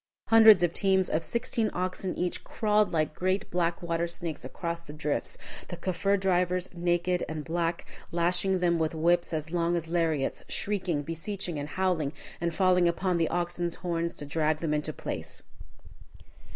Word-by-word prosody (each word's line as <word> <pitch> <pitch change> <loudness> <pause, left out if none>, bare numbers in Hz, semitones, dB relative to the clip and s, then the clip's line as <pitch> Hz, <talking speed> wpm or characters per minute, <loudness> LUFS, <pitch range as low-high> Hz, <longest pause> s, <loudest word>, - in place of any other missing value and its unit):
Hundreds 220 -4 +8
of 170 -1 +2
teams, 190 -2 +2
of 160 - +1
sixteen 230 0 -1
oxen 185 +1 -2
each, 180 0 -2
crawled 210 -1 +1
like 155 -2 0
great 185 +4 -1
black 175 -1 0
water 170 0 0
snakes 170 -2 -4
across 170 -1 -4
the 150 -3 -11
drifts, 150 -1 -2 0.3
the - - -6
Kaffir 195 +2 0
drivers, 180 -1 +1
naked 175 +1 0
and 155 -1 -4
black, 170 0 -1 0.3
lashing 175 +3 +2
them 170 -1 +2
with 160 0 0
whips 170 +2 +2
as 160 -1 -3
long 170 0 +1
as 165 -1 -3
lariats, 165 -5 0
shrieking, 185 -7 0
beseeching, 165 +1 -4
and 145 +1 -5
howling, 175 -6 0 0.3
and 170 0 0
falling 180 -1 +3
upon 180 +1 +1
the 165 - +2
oxen's 175 0 -1
horns 170 -1 -1
to 145 - -5
drag 155 +1 +1
them 155 -1 -1
into 150 +1 -1
place. - - -6
175 Hz, 165 wpm, -28 LUFS, 165-185 Hz, 0.3 s, Hundreds